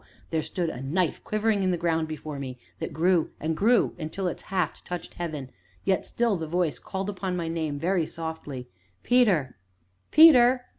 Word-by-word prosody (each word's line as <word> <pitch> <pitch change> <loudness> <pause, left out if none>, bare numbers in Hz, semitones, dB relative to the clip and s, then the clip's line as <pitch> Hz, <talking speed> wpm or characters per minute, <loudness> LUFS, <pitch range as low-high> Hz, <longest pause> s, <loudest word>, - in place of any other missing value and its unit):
there 160 -1 +1
stood 170 0 -2
a 125 - -7
knife 160 +5 0
quivering 215 -1 +1
in 190 - +2
the 180 - +1
ground 165 -1 0
before 155 -2 -6
me, 130 -2 -6 0.2
that - - -4
grew 170 0 +2
and 160 +1 -1
grew 225 +6 +3
until 165 +4 -4
its 180 - -2
haft 180 -5 -2
touched 180 -1 -6
heaven, 150 -7 -5 0.3
yet 190 -1 +1
still 235 -3 +1
the 165 -3 -4
voice 170 -2 0
called 190 0 -4
upon 190 -2 -3
my 170 -2 -2
name 160 -3 -2
very 170 +1 +1
softly: 160 -6 -6 0.4
"Peter! 190 - +3 0.5
Peter! 255 -5 +7
170 Hz, 170 wpm, -26 LUFS, 155-195 Hz, 0.5 s, Peter